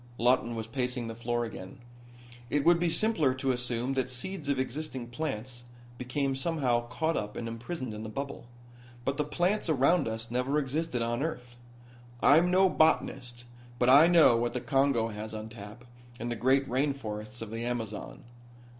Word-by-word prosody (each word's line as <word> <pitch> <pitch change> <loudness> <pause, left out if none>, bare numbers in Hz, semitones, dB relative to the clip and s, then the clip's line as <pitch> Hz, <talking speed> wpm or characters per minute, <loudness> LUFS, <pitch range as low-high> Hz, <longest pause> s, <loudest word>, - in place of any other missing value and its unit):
Lawton 120 0 +2
was 110 -1 -4
pacing 125 +1 -2
the 115 - -5
floor 120 +1 -2
again. 135 +4 -9 0.7
"It 145 -1 0
would 170 0 +6
be 175 0 +2
simpler 160 -9 +2
to 130 0 0
assume 125 +1 -1
that 130 -1 -1
seeds 145 +5 -5
of 140 - +1
existing 130 -1 -4
plants 125 -3 -5 0.4
became 135 +2 -1
somehow 130 -5 0
caught 160 +5 -1
up 105 0 -3
and 115 - -4
imprisoned 120 +2 -5
in 105 - -6
the 110 - -6
bubble. 140 0 -6 0.6
But 140 - -1
the 150 - +1
plants 175 +6 0
around 155 +3 +3
us 110 +1 -4
never 125 +4 0
existed 140 -3 -1
on 120 +2 -1
earth. 125 -6 -4 0.6
I'm 165 +8 +5
no 190 +1 +5
botanist, 125 -8 +1 0.3
but 125 0 +3
I 145 +5 +8
know 165 -8 +6
what 120 +1 0
the 125 - -1
Congo 135 -3 +2
has 110 0 -6
on 110 0 -6
tap, 110 +2 -11 0.4
and 120 0 -3
the - - -1
great 130 +4 +2
rain 135 +4 +1
forests 110 -2 -6
of 110 - -9
the 115 +1 -4
Amazon." 115 -3 -4
125 Hz, 175 wpm, -29 LUFS, 120-145 Hz, 0.7 s, I